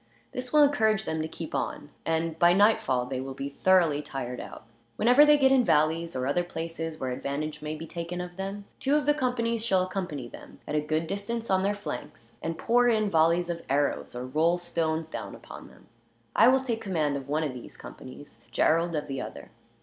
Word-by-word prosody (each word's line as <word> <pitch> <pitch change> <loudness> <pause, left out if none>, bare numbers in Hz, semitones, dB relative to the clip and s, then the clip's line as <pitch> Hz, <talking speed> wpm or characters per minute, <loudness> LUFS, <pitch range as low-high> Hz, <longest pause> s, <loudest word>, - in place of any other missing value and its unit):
This 250 0 -5
will 300 -1 +6
encourage 220 -7 +2
them 160 0 -2
to 155 - -2
keep 160 0 -8
on, 145 - -3 0.2
and 165 0 -1
by 175 0 +6
nightfall 185 - +3
they 130 0 -4
will 135 0 -6
be 140 +1 -6
thoroughly 175 -6 +4
tired 130 -4 -5
out. - - -9 0.3
"Whenever 250 - +6
they 295 0 +7
get 265 -2 +4
in 265 -2 +5
valleys, 160 0 +2
or 130 0 -1
other 145 +6 +1
places 165 -2 -5
where 130 -1 -2
advantage 150 +4 -4
may 150 0 -4
be 160 +1 -7
taken 170 +1 -5
of 180 0 -6
them, 195 +2 -5
two 280 +2 +2
of 300 - +1
the 295 - +4
companies 235 -5 -1
shall 190 -5 +2
accompany 180 -9 -4
them, - - -13
at - - -4
a 150 - +2
good 155 +2 -1
distance 200 +5 -4
on 190 0 +3
their 200 +2 +1
flanks; 115 - -8
and 165 0 -3
pour 245 +1 +3
in 215 -3 +2
volleys 165 +2 +3
of 170 0 -5
arrows, 140 -2 0
or 125 +1 -4
roll 160 +6 +2
stones 165 -2 -2
down - - -6
upon - - -11
them. - - -19 0.5
I 225 - +7
will 260 +1 +5
take 235 -4 -3
command 155 -8 0
of 140 0 -6
one 155 +2 +1
of 145 -4 -2
these 125 - -10
companies, 130 +3 -11
Gerald 165 +1 +2
of 150 - -2
the 135 -2 -4
other. 70 - -8
165 Hz, 210 wpm, -28 LUFS, 150-205 Hz, 0.5 s, they